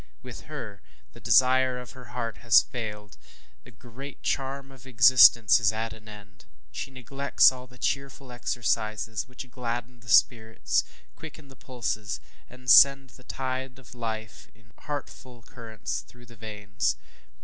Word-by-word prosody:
With 125 Hz, -2 st, -10 dB
her, 115 Hz, -10 st, -8 dB, 0.3 s
the -, -, -14 dB
desire 130 Hz, 0 st, +3 dB
of 125 Hz, -1 st, -9 dB
her 125 Hz, -1 st, -13 dB
heart 115 Hz, -4 st, -5 dB
has 115 Hz, -2 st, +5 dB
failed 105 Hz, -4 st, -7 dB, 0.5 s
the -, -, -15 dB
great 125 Hz, +4 st, -12 dB
charm 135 Hz, 0 st, -3 dB
of 130 Hz, -1 st, -16 dB
existence 115 Hz, -2 st, +6 dB
is 105 Hz, -2 st, +2 dB
at 110 Hz, +1 st, -4 dB
an 110 Hz, -1 st, -15 dB
end. 100 Hz, -3 st, -14 dB, 0.3 s
She 65 Hz, -, -6 dB
neglects 135 Hz, +2 st, +2 dB
all 130 Hz, -1 st, -11 dB
the 125 Hz, 0 st, -18 dB
cheerful 135 Hz, 0 st, -4 dB
exercises 110 Hz, -3 st, -2 dB
which 130 Hz, +1 st, -10 dB
gladden 120 Hz, 0 st, -5 dB
the 115 Hz, -1 st, -15 dB
spirits, 110 Hz, 0 st, +2 dB, 0.3 s
quicken 160 Hz, -2 st, -12 dB
the 135 Hz, -, -15 dB
pulses, 110 Hz, -5 st, -4 dB, 0.3 s
and 125 Hz, 0 st, -16 dB
send 140 Hz, -1 st, +7 dB
the 125 Hz, -, -18 dB
tide 130 Hz, 0 st, -5 dB
of 130 Hz, -2 st, -15 dB
life 110 Hz, -2 st, -7 dB
in 110 Hz, 0 st, -25 dB
healthful 130 Hz, -4 st, -8 dB
currents 115 Hz, -2 st, -6 dB
through 120 Hz, 0 st, -18 dB
the 120 Hz, 0 st, -16 dB
veins. 105 Hz, -, -3 dB
120 Hz, 150 wpm, -26 LUFS, 110-130 Hz, 0.5 s, send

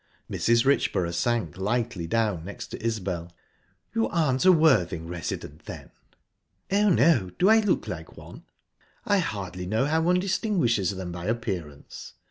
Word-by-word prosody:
Mrs. 115 Hz, +1 st, +2 dB
Richborough 90 Hz, -10 st, +1 dB
sank 110 Hz, -2 st, -1 dB
lightly 105 Hz, -3 st, -1 dB
down 105 Hz, -4 st, 0 dB
next 100 Hz, +4 st, -8 dB
to -, -, -8 dB
Isbel. 95 Hz, -7 st, -3 dB, 0.6 s
"You 225 Hz, 0 st, +1 dB
aren't 150 Hz, -6 st, +1 dB
a 185 Hz, -, +9 dB
Worthing 130 Hz, -, +3 dB
resident, 80 Hz, -3 st, -6 dB
then?" -, -, -9 dB, 0.8 s
"Oh, 205 Hz, +1 st, +3 dB
no. 140 Hz, -, +4 dB
Do 190 Hz, -, +4 dB
I 220 Hz, 0 st, +7 dB
look 210 Hz, -2 st, 0 dB
like -, -, -7 dB
one?" -, -, -12 dB, 0.6 s
"I 205 Hz, -1 st, +3 dB
hardly 95 Hz, -, -4 dB
know 110 Hz, +7 st, +1 dB
how 160 Hz, +2 st, +1 dB
one 180 Hz, +2 st, +3 dB
distinguishes 180 Hz, -, +1 dB
them 95 Hz, -2 st, -5 dB
by 85 Hz, 0 st, -6 dB
appearance. 95 Hz, -11 st, -5 dB
115 Hz, 145 wpm, -26 LUFS, -, 0.8 s, a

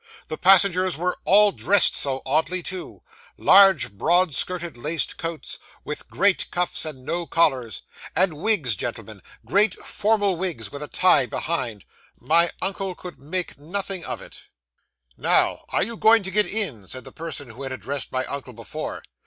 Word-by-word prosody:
The 155 Hz, -, -4 dB
passengers 185 Hz, -1 st, +4 dB
were 180 Hz, +2 st, -2 dB
all 205 Hz, +1 st, +6 dB
dressed 200 Hz, 0 st, +2 dB
so 135 Hz, -1 st, -2 dB
oddly 160 Hz, +6 st, 0 dB
too! 185 Hz, +1 st, -5 dB, 0.3 s
Large, 190 Hz, -, +6 dB
broad 170 Hz, -, +1 dB
skirted 175 Hz, 0 st, -2 dB
laced 150 Hz, +7 st, 0 dB
coats, 165 Hz, -1 st, -5 dB, 0.2 s
with 150 Hz, -, -7 dB
great 200 Hz, 0 st, +1 dB
cuffs 175 Hz, -2 st, 0 dB
and 135 Hz, -5 st, -8 dB
no 170 Hz, +2 st, -3 dB
collars; 130 Hz, -, 0 dB, 0.3 s
and 185 Hz, 0 st, +3 dB
wigs, 180 Hz, -, +3 dB
gentlemen -, -, -6 dB, 0.2 s
great 200 Hz, 0 st, +2 dB
formal 205 Hz, -3 st, +1 dB
wigs 160 Hz, -, -3 dB
with 140 Hz, -, -8 dB
a 150 Hz, -, -4 dB
tie 180 Hz, -8 st, +3 dB
behind. 125 Hz, -, -3 dB, 0.3 s
My 170 Hz, +2 st, +4 dB
uncle 190 Hz, -1 st, -2 dB
could 175 Hz, -7 st, -10 dB
make 165 Hz, +2 st, -2 dB
nothing 190 Hz, +3 st, -3 dB
of -, -, -5 dB
it. -, -, -12 dB, 0.8 s
'"Now, -, -, +2 dB
are -, -, +1 dB
you 230 Hz, +3 st, -5 dB
going 220 Hz, 0 st, +5 dB
to 190 Hz, -, -2 dB
get 210 Hz, +1 st, +3 dB
in?" 150 Hz, -, -1 dB
said 130 Hz, +4 st, -6 dB
the -, -, -10 dB
person 155 Hz, -6 st, -7 dB
who 120 Hz, +5 st, -12 dB
had 135 Hz, -1 st, -5 dB
addressed 135 Hz, +1 st, -4 dB
my 130 Hz, 0 st, -1 dB
uncle 135 Hz, -3 st, -7 dB
before. 115 Hz, 0 st, -7 dB
170 Hz, 160 wpm, -23 LUFS, 140-190 Hz, 0.8 s, all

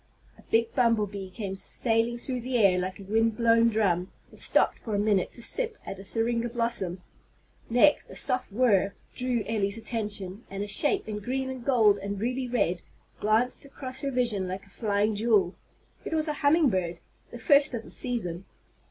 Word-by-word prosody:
A -, -, -18 dB
big 225 Hz, 0 st, +2 dB
bumble 230 Hz, -5 st, +3 dB
bee 195 Hz, -1 st, -7 dB
came 195 Hz, 0 st, -5 dB
sailing 225 Hz, +4 st, +1 dB
through 250 Hz, 0 st, -4 dB
the 250 Hz, +1 st, -1 dB
air 195 Hz, -5 st, +4 dB
like 185 Hz, +2 st, -4 dB
a -, -, -9 dB
wind 225 Hz, +2 st, +1 dB
blown 230 Hz, 0 st, +4 dB
drum, 190 Hz, -5 st, 0 dB, 0.2 s
and -, -, -15 dB
stopped -, -, +2 dB
for 220 Hz, -3 st, -4 dB
a -, -, +1 dB
minute 205 Hz, -3 st, +1 dB
to 235 Hz, -, -6 dB
sip 465 Hz, -, -1 dB
at 195 Hz, -, -7 dB
a -, -, -9 dB
syringa 230 Hz, +3 st, 0 dB
blossom. 225 Hz, -7 st, -2 dB, 0.7 s
Next 245 Hz, +6 st, +4 dB
a -, -, -10 dB
soft 255 Hz, -5 st, 0 dB
whir 200 Hz, -4 st, +2 dB, 0.2 s
drew 250 Hz, -3 st, -1 dB
Elly's 205 Hz, -2 st, -1 dB
attention, 210 Hz, -3 st, -4 dB
and 195 Hz, +1 st, -4 dB
a -, -, -5 dB
shape 295 Hz, -, +1 dB
in 210 Hz, -1 st, -4 dB
green 260 Hz, +5 st, -3 dB
and 255 Hz, -2 st, -7 dB
gold 220 Hz, -6 st, +4 dB
and 200 Hz, 0 st, -4 dB
ruby 250 Hz, +4 st, -2 dB
red 185 Hz, -8 st, 0 dB, 0.4 s
glanced 220 Hz, +4 st, +1 dB
across 265 Hz, -2 st, -5 dB
her 280 Hz, -, -1 dB
vision 235 Hz, -7 st, +1 dB
like 190 Hz, +2 st, -5 dB
a 195 Hz, -, -22 dB
flying 210 Hz, +1 st, 0 dB
jewel. 210 Hz, -4 st, +2 dB, 0.5 s
It -, -, -5 dB
was 310 Hz, 0 st, +1 dB
a 300 Hz, -, 0 dB
humming 290 Hz, -1 st, +4 dB
bird, 175 Hz, -3 st, -2 dB, 0.3 s
the -, -, -9 dB
first 280 Hz, +2 st, +4 dB
of 225 Hz, -, -5 dB
the -, -, -13 dB
season. 195 Hz, -8 st, -1 dB
225 Hz, 190 wpm, -27 LUFS, 200-245 Hz, 0.7 s, air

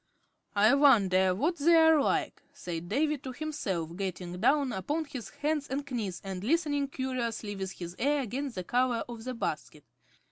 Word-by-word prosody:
"I 210 Hz, +4 st, +5 dB
wonder 195 Hz, -10 st, +5 dB
what 320 Hz, -, 0 dB
they're 320 Hz, 0 st, +6 dB
like," -, -, 0 dB
said 175 Hz, -1 st, -6 dB
Davy 295 Hz, +5 st, +1 dB
to 260 Hz, 0 st, -7 dB
himself, 195 Hz, -, -3 dB
getting 180 Hz, -2 st, -4 dB
down 280 Hz, -2 st, +3 dB
upon 290 Hz, -, -2 dB
his 255 Hz, -7 st, -7 dB
hands 300 Hz, -1 st, -2 dB
and 280 Hz, +2 st, -3 dB
knees 205 Hz, -8 st, -3 dB
and 190 Hz, -1 st, -5 dB
listening 290 Hz, +1 st, +1 dB
curiously 245 Hz, -6 st, -3 dB
with 190 Hz, -1 st, -4 dB
his 175 Hz, 0 st, -8 dB
ear 285 Hz, +2 st, +2 dB
against 265 Hz, +2 st, -4 dB
the 185 Hz, -, -3 dB
cover 245 Hz, +3 st, +1 dB
of 235 Hz, -1 st, -8 dB
the 255 Hz, 0 st, -4 dB
basket. 230 Hz, -, -4 dB
250 Hz, 165 wpm, -30 LUFS, 190-290 Hz, -, they're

